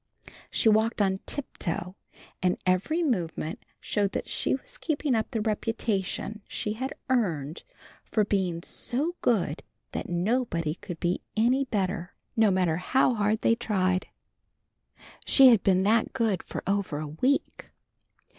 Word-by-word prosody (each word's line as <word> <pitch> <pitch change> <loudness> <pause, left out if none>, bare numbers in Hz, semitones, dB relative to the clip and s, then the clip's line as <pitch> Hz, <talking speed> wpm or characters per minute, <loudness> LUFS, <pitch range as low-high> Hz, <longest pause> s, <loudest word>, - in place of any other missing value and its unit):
She - - +1
walked 220 +2 +3
on 190 -2 +2
tiptoe, 180 - -2 0.5
and 180 0 +2
every 195 - +1
movement 175 - -2 0.2
showed 200 -2 -1
that - - -3
she - - 0
was - - -10
keeping 295 -3 0
up 220 -2 0
the 225 - -2
reputation 215 -1 -2
she 210 - -3
had 260 +5 -4
earned 170 - 0 0.6
of 210 -2 +4
being 180 -5 0
"so 295 +9 -2
good 180 -10 +1 0.3
that - - -4
nobody 175 -3 0
could 170 -1 -8
be 175 +1 0 0.2
any 250 +5 +3
better, 195 -5 -2 0.2
no 220 -2 +5
matter 180 -4 +2
how 255 +7 +2
hard 210 0 0
he 230 - +4
tried." 185 -5 0 1.2
She 270 -2 +8
had 230 -5 +5
been 190 -1 +3
that 220 +3 +2
good 225 -7 +1
for - - -6
over 195 -6 0
a 155 0 -4
week. 250 - -1
210 Hz, 140 wpm, -27 LUFS, 180-235 Hz, 1.2 s, She